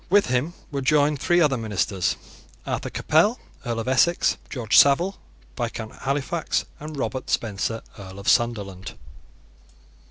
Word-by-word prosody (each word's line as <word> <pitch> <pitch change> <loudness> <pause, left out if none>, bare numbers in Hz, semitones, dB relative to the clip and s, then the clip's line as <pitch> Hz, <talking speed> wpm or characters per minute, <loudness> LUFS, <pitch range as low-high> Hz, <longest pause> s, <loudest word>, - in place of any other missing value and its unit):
With 200 +2 +5
him 130 +8 -1 0.2
were 140 -1 -2
joined 145 +1 +3
three 175 +4 +3
other 145 -5 +3
ministers, 105 -4 -1 0.5
Arthur - - -3
Capel, 205 +10 +2 0.2
Earl 120 -3 -2
of 115 - -7
Essex, 130 +7 +3
George 115 -5 -1
Savile, 170 +8 +5 0.4
Viscount 115 -3 -4
Halifax, 140 +4 -1
and 150 0 -7
Robert 130 -1 -3
Spencer, 110 +1 -1 0.2
Earl 95 -1 -10
of 100 +2 -9
Sunderland. 100 -7 0
130 Hz, 130 wpm, -24 LUFS, 110-150 Hz, 0.5 s, With